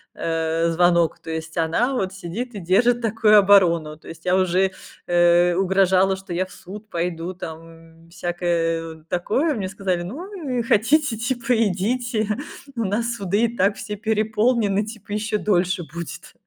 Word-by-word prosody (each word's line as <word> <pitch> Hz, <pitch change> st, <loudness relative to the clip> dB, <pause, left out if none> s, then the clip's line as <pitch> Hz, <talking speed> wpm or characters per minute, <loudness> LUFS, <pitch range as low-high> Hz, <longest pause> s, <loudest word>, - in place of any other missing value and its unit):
э, 165 Hz, 0 st, 0 dB
звонок. 170 Hz, 0 st, +2 dB
То 165 Hz, -, -11 dB
есть 160 Hz, 0 st, -6 dB
она 170 Hz, +11 st, +1 dB
вот 190 Hz, -7 st, -1 dB
сидит 195 Hz, +6 st, -6 dB
и -, -, -4 dB
держит 235 Hz, +7 st, +2 dB
такую 220 Hz, -1 st, +4 dB
оборону. 175 Hz, -6 st, +4 dB
То -, -, -14 dB
есть 165 Hz, +1 st, -11 dB
я 180 Hz, 0 st, +3 dB
уже, 185 Hz, +1 st, +2 dB, 0.4 s
э, 175 Hz, 0 st, +4 dB
угрожала, 190 Hz, 0 st, +3 dB
что 190 Hz, -2 st, -8 dB
я 180 Hz, +2 st, 0 dB
в 185 Hz, -, -17 dB
суд 210 Hz, +3 st, -11 dB
пойду, 170 Hz, 0 st, -3 dB
там, 165 Hz, -1 st, -11 dB
всякое, 170 Hz, -2 st, -2 dB
э, -, -, -27 dB
такое. 260 Hz, -, 0 dB
Мне 190 Hz, -4 st, -3 dB
сказали: 190 Hz, -3 st, -2 dB
"Ну, 310 Hz, -, -5 dB
и -, -, +1 dB
хотите, 250 Hz, +4 st, +2 dB
типа 245 Hz, +1 st, -1 dB
идите, 215 Hz, +2 st, -1 dB, 0.4 s
у 230 Hz, -, -1 dB
нас 230 Hz, +4 st, -1 dB
суды 200 Hz, +1 st, +1 dB
и 235 Hz, 0 st, -3 dB
так 200 Hz, +2 st, +2 dB
все 210 Hz, -, -5 dB
переполнены". 215 Hz, 0 st, +1 dB
Типа 215 Hz, -1 st, -9 dB
еще 215 Hz, +1 st, -1 dB
дольше 185 Hz, -3 st, +1 dB
будет. 170 Hz, -1 st, -8 dB
190 Hz, 160 wpm, -22 LUFS, 170-220 Hz, 0.4 s, такую